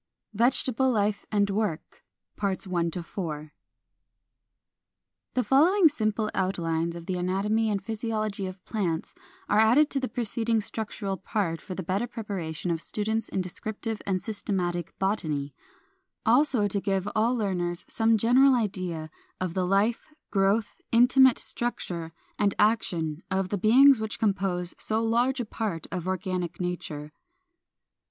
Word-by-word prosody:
VEGETABLE 255 Hz, +3 st, +3 dB
LIFE 210 Hz, -2 st, 0 dB
AND 205 Hz, -1 st, +2 dB
WORK. 200 Hz, -6 st, -3 dB, 0.4 s
393. 170 Hz, -4 st, -3 dB, 1.8 s
The 250 Hz, -, +2 dB
following 325 Hz, +8 st, +5 dB
simple 215 Hz, -5 st, -1 dB
outlines 170 Hz, -3 st, -1 dB
of 170 Hz, -1 st, -8 dB
the 185 Hz, 0 st, -2 dB
anatomy 200 Hz, +5 st, 0 dB
and 200 Hz, -2 st, -1 dB
physiology 215 Hz, -3 st, -2 dB
of 185 Hz, 0 st, -10 dB
plants 175 Hz, -7 st, -2 dB
(3) -, -, -27 dB, 0.3 s
are 210 Hz, -, +4 dB
added 245 Hz, +8 st, +5 dB
to 275 Hz, -, 0 dB
the 260 Hz, -, -2 dB
preceding 230 Hz, 0 st, -1 dB
structural 205 Hz, -2 st, -4 dB
part 185 Hz, -4 st, -2 dB
for 185 Hz, -, -7 dB
the 185 Hz, -, -4 dB
better 195 Hz, +7 st, -1 dB
preparation 185 Hz, -8 st, -4 dB
of 165 Hz, -1 st, -1 dB
students 220 Hz, +4 st, -2 dB
in 190 Hz, -, -1 dB
descriptive 215 Hz, +4 st, -5 dB
and 190 Hz, -2 st, +1 dB
systematic 180 Hz, -6 st, -3 dB
botany; 155 Hz, -8 st, -1 dB, 0.7 s
also 245 Hz, -2 st, +3 dB
to 200 Hz, 0 st, -2 dB
give 195 Hz, -2 st, 0 dB
to 205 Hz, -, -4 dB
all 225 Hz, +3 st, +2 dB
learners 180 Hz, -6 st, -2 dB
some 225 Hz, 0 st, +2 dB
general 255 Hz, +5 st, +5 dB
idea 185 Hz, -8 st, -2 dB, 0.3 s
of 185 Hz, -3 st, -2 dB
the 185 Hz, -1 st, 0 dB
life, 200 Hz, +5 st, +1 dB, 0.2 s
growth, 200 Hz, +2 st, +1 dB
intimate 250 Hz, +2 st, +6 dB
structure, 175 Hz, -9 st, 0 dB, 0.3 s
and 200 Hz, -2 st, +2 dB
action 175 Hz, -8 st, +1 dB
of 190 Hz, -1 st, 0 dB
the 205 Hz, -, -1 dB
beings 260 Hz, +5 st, +6 dB
which 220 Hz, 0 st, -3 dB
compose 190 Hz, -4 st, 0 dB
so 220 Hz, 0 st, 0 dB
large 240 Hz, +4 st, +1 dB
a 245 Hz, -, -1 dB
part 210 Hz, -7 st, -3 dB
of 185 Hz, -1 st, -4 dB
organic 185 Hz, -2 st, -2 dB
nature. 155 Hz, -4 st, -4 dB
200 Hz, 135 wpm, -27 LUFS, 180-225 Hz, 1.8 s, intimate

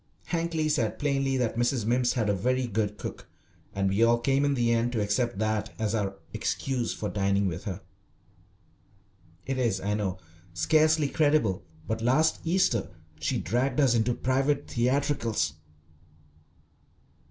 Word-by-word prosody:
Hankly 165 Hz, -2 st, 0 dB
said 120 Hz, -8 st, 0 dB
plainly 135 Hz, -2 st, 0 dB
that 120 Hz, -2 st, -1 dB
Mrs. 120 Hz, -1 st, +1 dB
Mimms 120 Hz, +2 st, +2 dB
had 115 Hz, -4 st, 0 dB
a 105 Hz, -, +2 dB
very 125 Hz, +7 st, 0 dB
good 105 Hz, -2 st, -2 dB
cook, -, -, -7 dB, 0.5 s
and 100 Hz, 0 st, +1 dB
we 100 Hz, +3 st, +1 dB
all 115 Hz, +1 st, +5 dB
came 135 Hz, +4 st, +1 dB
in 140 Hz, -1 st, +2 dB
the 120 Hz, -2 st, +2 dB
end 115 Hz, +1 st, +1 dB
to 115 Hz, -, 0 dB
accept 105 Hz, +1 st, 0 dB
that 110 Hz, 0 st, -1 dB
as 110 Hz, -1 st, -1 dB
our 100 Hz, -3 st, -1 dB, 0.2 s
excuse 130 Hz, -3 st, -1 dB
for 105 Hz, -, -4 dB
dining 100 Hz, 0 st, +1 dB
with 90 Hz, 0 st, -3 dB
her. 95 Hz, -2 st, -4 dB, 1.6 s
It 135 Hz, -1 st, -2 dB
is, 115 Hz, -6 st, +1 dB
I 100 Hz, +2 st, -1 dB
know, 100 Hz, -3 st, -2 dB, 0.4 s
scarcely 155 Hz, -, +3 dB
credible, 145 Hz, -, +2 dB, 0.3 s
but 110 Hz, +2 st, -2 dB
last 135 Hz, +7 st, +3 dB
Easter 170 Hz, -, +1 dB, 0.3 s
she -, -, -1 dB
dragged 125 Hz, -, 0 dB
us 135 Hz, -4 st, +4 dB
into 120 Hz, +1 st, +1 dB
private 135 Hz, +3 st, 0 dB
theatricals. 120 Hz, -, 0 dB
120 Hz, 150 wpm, -27 LUFS, 105-135 Hz, 1.6 s, all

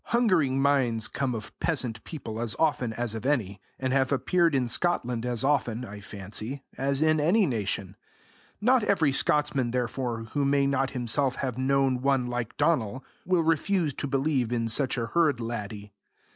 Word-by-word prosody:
Hungering 185 Hz, -, +2 dB
minds 130 Hz, -5 st, +2 dB
come 130 Hz, -3 st, -2 dB
of 110 Hz, -1 st, -7 dB
peasant 125 Hz, -9 st, -2 dB
people 115 Hz, -8 st, -6 dB
as 120 Hz, -2 st, 0 dB
often 145 Hz, -7 st, +1 dB
as 120 Hz, -1 st, -3 dB
of 110 Hz, -1 st, -5 dB
any, 105 Hz, -9 st, -1 dB, 0.2 s
and 130 Hz, 0 st, -1 dB
have 135 Hz, -1 st, +2 dB
appeared 165 Hz, +4 st, +2 dB
in 130 Hz, -2 st, +1 dB
Scotland 125 Hz, -4 st, 0 dB
as 120 Hz, -1 st, -2 dB
often, 125 Hz, -4 st, 0 dB
I 105 Hz, -2 st, -9 dB
fancy, 105 Hz, +7 st, -6 dB
as 140 Hz, +2 st, 0 dB
in 155 Hz, 0 st, +3 dB
any 185 Hz, +8 st, +4 dB
nation; 100 Hz, -, -2 dB, 0.6 s
not 250 Hz, +3 st, +4 dB
every 165 Hz, -9 st, +2 dB
Scotsman, 140 Hz, -3 st, +2 dB
therefore, 120 Hz, -1 st, -2 dB
who 145 Hz, -, +1 dB
may 140 Hz, 0 st, +3 dB
not 135 Hz, -1 st, +1 dB
himself 130 Hz, +1 st, -1 dB
have 130 Hz, -2 st, -3 dB
known 135 Hz, -1 st, +2 dB
one 135 Hz, -2 st, +2 dB
like 120 Hz, -2 st, -4 dB
Donal, 135 Hz, -6 st, 0 dB, 0.2 s
will 180 Hz, -2 st, +3 dB
refuse 165 Hz, 0 st, +1 dB
to 140 Hz, -, -4 dB
believe 135 Hz, -3 st, 0 dB
in 115 Hz, -1 st, 0 dB
such 130 Hz, +4 st, 0 dB
a 115 Hz, -, -1 dB
herd 155 Hz, -2 st, +2 dB
laddie. 105 Hz, -3 st, -5 dB
130 Hz, 170 wpm, -27 LUFS, 115-145 Hz, 0.6 s, any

